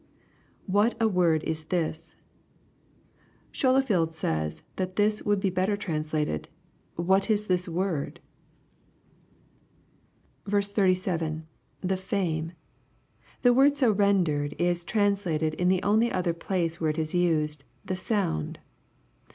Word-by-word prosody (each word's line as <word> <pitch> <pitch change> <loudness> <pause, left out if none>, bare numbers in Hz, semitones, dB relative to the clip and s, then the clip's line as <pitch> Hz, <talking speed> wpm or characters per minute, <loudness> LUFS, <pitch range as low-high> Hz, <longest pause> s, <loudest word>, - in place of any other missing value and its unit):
[What 205 +4 +2
a 225 - +4
word 175 -6 +2
is 160 -1 -3
this,] 160 -1 -3 1.4
Scholefield 250 - +2
says 80 - -2
that 185 -1 -3
this 210 +1 +2
would 205 -1 +1
be 195 -1 0
better 185 +3 0
translated, 155 - -2 0.2
" - - -38
What 190 +4 +2
is 210 -1 +2
this 180 -2 0
word?" 170 -3 -2 2.3
37. 185 -6 0 0.2
— - - -40
[The 190 0 0
fame.] 175 -4 -2 0.9
The 245 -1 +6
word 275 +3 +5
so 260 -6 +4
rendered 180 -8 +1
is 175 0 0
translated 195 -7 0
in 180 +3 0
the 185 0 +2
only 220 +4 +3
other 180 -2 0
place 170 -1 -2
where 160 - +2
it 155 - -2
is 155 -1 -2
used, 155 -5 +1 0.2
"the 185 - -2
sound." 185 - -1
180 Hz, 120 wpm, -27 LUFS, 160-200 Hz, 2.3 s, The